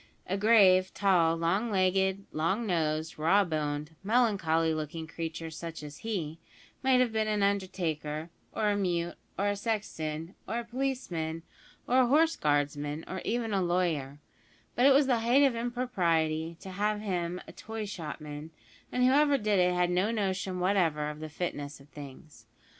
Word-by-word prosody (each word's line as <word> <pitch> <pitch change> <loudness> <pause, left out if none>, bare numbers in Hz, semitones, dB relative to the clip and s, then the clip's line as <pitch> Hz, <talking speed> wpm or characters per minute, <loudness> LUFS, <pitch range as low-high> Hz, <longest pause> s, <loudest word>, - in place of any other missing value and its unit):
A 190 - -1
grave, 195 -3 +5
tall, 170 -5 +3
long 190 +8 0
legged, 190 0 +1
long 190 +9 0
nosed, 160 -4 -1
raw 190 +6 +4
boned, 150 -2 -3
melancholy 190 -8 +2
looking 155 +1 -4
creature 165 0 -5
such 165 -1 -7
as 150 0 -9
he, 170 -8 -4 0.4
might 260 -1 +4
have 245 -2 +2
been 220 -1 +1
an 210 -1 +1
undertaker, 170 -5 -2 0.2
or 210 -1 +1
a - - +1
mute, 175 -3 -1 0.2
or 200 +1 +1
a 205 - 0
sexton, 180 -6 -3
or 230 - -2
a 235 - -3
policeman, 230 -11 -3 0.4
or 255 +2 +3
a 255 - +5
horse 320 +5 +4
guardsman, 145 +1 -1
or 185 - -5
even 230 -2 -1
a 195 - +2
lawyer; 170 -6 0 0.6
but 250 +3 +4
it - - +7
was 275 +1 +5
the 250 -3 +2
height 245 +5 +4
of 270 -4 +3
impropriety 170 -10 0
to 190 - -8
have 210 +3 0
made 215 - -8
him 180 -2 -2
a - - -9
toy 220 -1 -6
shopman, 155 -5 -7 0.4
and 250 - +1
whoever 280 +2 +5
did 210 -4 +1
it 180 0 +3
had 180 0 +2
no 185 +4 +2
notion 190 -4 -1
whatever 170 -6 +1
of 150 - -10
the 155 0 -6
fitness 145 -3 -4
of 140 - -17
things. 140 -4 -12
185 Hz, 170 wpm, -30 LUFS, 160-215 Hz, 0.6 s, it